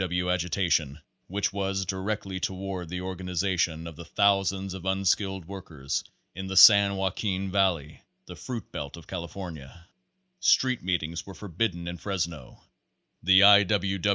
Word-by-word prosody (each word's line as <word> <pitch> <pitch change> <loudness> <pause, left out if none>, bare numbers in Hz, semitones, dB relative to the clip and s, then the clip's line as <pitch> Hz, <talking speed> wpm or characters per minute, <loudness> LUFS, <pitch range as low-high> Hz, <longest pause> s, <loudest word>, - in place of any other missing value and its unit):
W. 90 -1 -1
W. 90 0 +1
agitation, 85 -4 0 0.3
which 100 +2 -2
was 95 -1 -2
directed 95 0 -3
toward 95 -2 -4
the 90 +1 -4
organization 90 -2 -2
of 85 -2 -8
the 85 - -9
thousands 95 0 +1
of 95 -2 -8
unskilled 95 -1 0
workers 80 -7 -5 0.3
in 95 +2 -6
the 95 0 -3
San 100 -1 +8
Joaquin 95 0 -2
Valley, 90 -7 0 0.2
the - - -10
fruit 120 -5 -7
belt 70 +2 -6
of 85 - -13
California. 85 -3 -8 0.5
Street 130 -2 +3
meetings 85 -2 -2
were 95 - -9
forbidden 90 -2 -3
in 85 0 -5
Fresno. 85 -10 -5 0.6
The 95 +3 +6
I. 100 -1 +8
95 Hz, 140 wpm, -27 LUFS, 85-95 Hz, 0.6 s, San